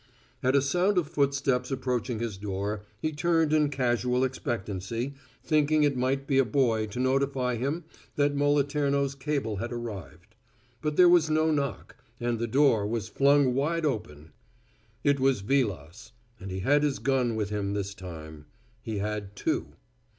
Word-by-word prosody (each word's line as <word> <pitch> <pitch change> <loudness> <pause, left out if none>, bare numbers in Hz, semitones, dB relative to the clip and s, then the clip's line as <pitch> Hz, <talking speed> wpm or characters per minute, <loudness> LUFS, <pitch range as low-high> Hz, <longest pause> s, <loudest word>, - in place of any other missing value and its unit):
At 130 +2 +2
a 140 - +4
sound 180 +7 +1
of 170 -5 +2
footsteps 140 -4 0
approaching 125 -3 -2
his 115 -2 -3
door, 100 +1 -3 0.2
he 155 - -1
turned 160 0 +1
in 150 -2 +3
casual 125 -2 +1
expectancy, 120 -1 -3 0.3
thinking 155 0 +3
it 145 -2 +2
might 130 +2 0
be 135 -1 +2
a - - +6
boy 115 -3 +1
to 105 +4 -6
notify 130 -1 +1
him 140 +8 -2 0.3
that 145 0 +2
Moliterno's 140 -1 +1
cable 135 -6 -2
had 120 +5 -4
arrived. 105 -5 -7 0.5
But 150 -1 -1
there 180 +2 +7
was 175 -3 +5
no 155 +1 +2
knock, 140 -4 -3 0.2
and 120 -1 -1
the 115 - -1
door 115 -4 +3
was 110 0 -3
flung 140 0 +4
wide 155 +5 0
open. 80 - -4 0.7
It 140 -1 +3
was 130 -5 +2
Vilas, 105 - -2 0.3
and 95 - -7
he 95 0 -4
had 145 +8 +3
his 145 -2 +1
gun 130 -4 +1
with 105 -1 -2
him 100 -1 -2
this 100 -1 -3
time. 80 -5 -10 0.3
He 110 -2 -4
had 105 -1 -4
two. - - -2
130 Hz, 160 wpm, -28 LUFS, 105-145 Hz, 0.7 s, there